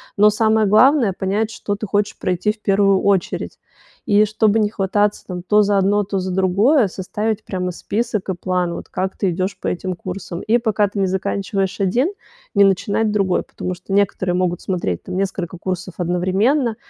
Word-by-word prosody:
Но, 210 +1 +6
самое 220 0 +2
главное, 235 +1 +4
понять, 205 +3 0
что 205 -2 -4
ты 210 +1 -6
хочешь 205 +1 -1
пройти 185 +3 0
в 215 0 -12
первую 195 -1 +3
очередь. 195 -3 0 0.5
И 210 +1 +4
чтобы 215 0 +2
не 210 -1 +2
хвататься 205 0 0
там 180 -1 -5
то 210 +4 +3
за 200 -1 +2
одно, 205 +2 +2
то 195 -1 -2
за 185 0 -3
другое, 200 +7 +3
составить 210 +4 -3
прямо 180 -1 -3
список 215 +2 -3
и 190 - -1
план: 180 -1 -1
вот - - -8
как 190 +1 -3
ты 190 -3 0
идёшь 185 +3 -3
по - - -4
этим 185 0 -2
курсам. 180 -1 -6
И 235 +3 +2
пока 215 -3 +1
ты 200 +1 -5
не 190 - +2
заканчиваешь 190 +1 -2
один- 235 - +1 0.5
не 200 - +6
начинать 200 +3 +1
другой, 195 -3 +1
потому 185 - -5
что 185 +2 -8
некоторые 190 -2 +1
могут 180 -1 0
смотреть 170 - -2
там 180 - -5
несколько 190 -2 -3
курсов 180 0 -4
одновременно. 190 - +1
195 Hz, 185 wpm, -20 LUFS, 185-210 Hz, 0.5 s, Но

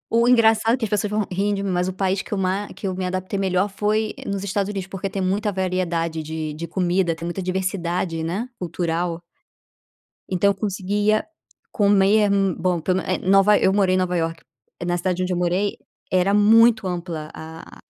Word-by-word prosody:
o 235 +1 +4
engraçado 225 -1 +4
é - - -7
que 230 - -2
as - - -6
pessoas 210 0 0
vão 210 -1 -1
rir 200 +3 0
de 200 - -3
mim, 195 - -1
mas 180 0 0
o 185 - -3
país 190 0 0
que - - -14
eu 205 - 0
ma 190 +2 -1
que 200 - -6
eu 185 - -2
me 185 - -3
adaptei 185 +2 -3
melhor 190 0 +1
foi 210 +2 -1
nos 200 -1 -3
Estados 200 0 -1
Unidos, 195 -3 -4
porque 195 0 -4
tem 195 - -3
muita 205 +3 0
variedade 180 -3 -1
de 155 0 -4
de 165 +3 -6
comida, 175 0 0
tem 165 +1 -7
muita 175 +3 -3
diversidade, 180 -2 -2
né, 190 +9 -2
cultural. 170 0 -2 1.1
Então 190 +2 +2
eu 200 - +1
conseguia 205 +1 0 0.5
comer 205 0 +3
hum, 195 -3 +2
bom, 180 -2 0
pelo 185 +3 0
me 185 - -1
Nova 195 +2 +5
eu 190 - +3
morei 195 -2 +3
em - - +2
Nova 180 -1 0
Iorque. 165 -1 -3 0.4
Na 175 0 0
cidade 185 0 -1
onde 180 0 -1
eu - - -1
morei 180 +3 0 0.3
era 185 +2 +2
muito 220 +1 +5
ampla 170 -4 -4
a 160 +1 -10
190 Hz, 200 wpm, -22 LUFS, 175-205 Hz, 1.1 s, Nova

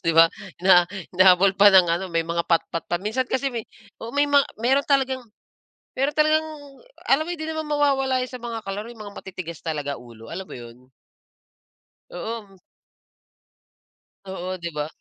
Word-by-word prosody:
'Di 165 - +2
ba? 165 0 +8 0.3
Hina 180 -2 +7 0.3
hinahabol 185 +1 +6
pa 205 0 +8
ng 185 -2 +8
ano, 175 +3 0
may 165 0 +2
mga 170 +1 -2
patpat 165 -1 0
pa. 175 - 0
Minsan 235 +5 -1
kasi 265 +2 -1
may 230 -3 -5 0.3
oo, 230 - -8
may 290 0 +2
ma 285 -1 +5 0.2
meron 265 +4 +2
talagang 265 -2 +2 0.8
meron 275 +3 0
talagang 310 +1 +3 0.6
alam 280 +3 +4
mo 350 - -3
hindi 315 - -7
naman 315 -1 -4
mawawala 270 -3 +1
sa 250 - -8
mga 230 -2 -6
kalaro 205 +3 -5
'yung 230 -3 -10
mga 205 0 -10
matitigas 175 -4 -8
talaga 145 -3 -3
ulo, 115 0 -13
alam 190 +3 -5
mo - - -9
'yun? 120 -1 -11 1.3
Oo. 200 +1 -7 1.7
Oo, 185 -1 -5
'di 170 0 -5
ba? 150 -1 -3
200 Hz, 165 wpm, -23 LUFS, 170-265 Hz, 1.7 s, ba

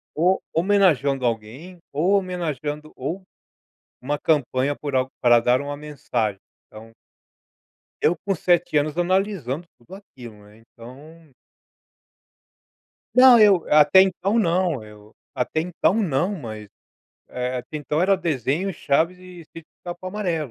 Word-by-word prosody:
ou 180 +5 +2
homenageando 165 -8 +2
alguém 120 +11 -5
ou 160 +7 0
homenageando 155 -6 -3
ou 165 +9 -5 0.8
uma 145 +3 -2
campanha 140 -2 0
por 145 -2 -6
algo 130 0 0
para 120 -1 +5
dar 125 +2 +2
uma 145 0 -5
mensagem, 140 -9 -3 0.3
então 110 +1 -14 1.1
eu 175 - +2
com 195 - -3
7 175 -2 +1
anos 150 +1 0
analisando 175 - -1
tudo 120 +10 -14
aquilo, 120 - -13
né, 105 +2 -19
então 140 +8 -15 1.9
Não, 255 -2 +8
eu 200 -5 +5
até 150 +4 +6
então 195 +4 0
não, 170 - 0
eu 105 0 -16 0.2
até 155 +5 -1
então 180 +2 0
não 185 -2 0
mas, 110 - -8 0.6
eh, 125 0 -3
até 125 +5 -6
então 150 +2 -2
era 195 +2 +3
desenho, 165 - -2
chaves 165 +4 0
e 180 -1 -13
sítio 165 +1 -13
do - - -78
pica 175 0 -6
pau 185 - -8
amarelo. 175 - -3
155 Hz, 135 wpm, -22 LUFS, 130-180 Hz, 1.9 s, Não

